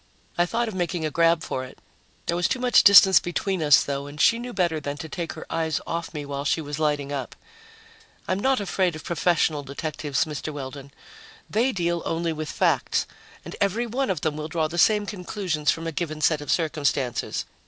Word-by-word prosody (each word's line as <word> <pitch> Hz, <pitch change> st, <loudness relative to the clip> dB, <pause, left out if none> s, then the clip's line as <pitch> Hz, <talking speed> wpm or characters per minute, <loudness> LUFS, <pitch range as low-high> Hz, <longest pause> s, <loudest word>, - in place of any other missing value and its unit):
I 175 Hz, 0 st, +2 dB
thought 235 Hz, +4 st, -1 dB
of 220 Hz, -, -4 dB
making 175 Hz, -2 st, -2 dB
a 155 Hz, -, -2 dB
grab 165 Hz, +1 st, +3 dB
for 130 Hz, -, -3 dB
it. 130 Hz, -, -11 dB, 0.5 s
There 170 Hz, -, -1 dB
was 175 Hz, 0 st, +1 dB
too -, -, -1 dB
much 250 Hz, -1 st, +5 dB
distance 195 Hz, -1 st, +9 dB
between 185 Hz, +1 st, -2 dB
us, 150 Hz, -2 st, +6 dB
though, 140 Hz, 0 st, -4 dB
and 145 Hz, +1 st, -10 dB
she 230 Hz, +10 st, +4 dB
knew 245 Hz, +1 st, -6 dB
better 175 Hz, -7 st, 0 dB
than 145 Hz, -1 st, -5 dB
to 160 Hz, -, -7 dB
take 170 Hz, +1 st, -5 dB
her -, -, -9 dB
eyes 160 Hz, -1 st, -1 dB
off 165 Hz, 0 st, -4 dB
me 150 Hz, -2 st, -6 dB
while 140 Hz, 0 st, -4 dB
she 145 Hz, -, +1 dB
was 145 Hz, -1 st, -5 dB
lighting 145 Hz, -2 st, 0 dB
up. 135 Hz, -3 st, -4 dB, 0.9 s
"I'm 185 Hz, -, 0 dB
not 265 Hz, +3 st, +2 dB
afraid 190 Hz, -4 st, 0 dB
of 155 Hz, -, -9 dB
professional 170 Hz, -3 st, +1 dB
detectives, 145 Hz, 0 st, -2 dB
Mr. 155 Hz, 0 st, -5 dB
Weldon. 140 Hz, -1 st, -8 dB, 0.6 s
They 235 Hz, +5 st, +1 dB
deal 170 Hz, -4 st, -1 dB
only 165 Hz, 0 st, -1 dB
with 155 Hz, -1 st, -5 dB
facts -, -, +1 dB, 0.4 s
and -, -, -7 dB
every 200 Hz, +4 st, +1 dB
one 245 Hz, +2 st, -2 dB
of 180 Hz, -6 st, -1 dB
them 155 Hz, -2 st, -1 dB
will 155 Hz, 0 st, -4 dB
draw 160 Hz, 0 st, -1 dB
the 170 Hz, +2 st, -4 dB
same 210 Hz, +3 st, +4 dB
conclusions 180 Hz, -6 st, -3 dB
from 165 Hz, -, 0 dB
a 165 Hz, -, -2 dB
given 155 Hz, -1 st, -4 dB
set 155 Hz, -1 st, +2 dB
of 145 Hz, -, -9 dB
circumstances. 145 Hz, -6 st, -1 dB
165 Hz, 205 wpm, -25 LUFS, 150-185 Hz, 0.9 s, distance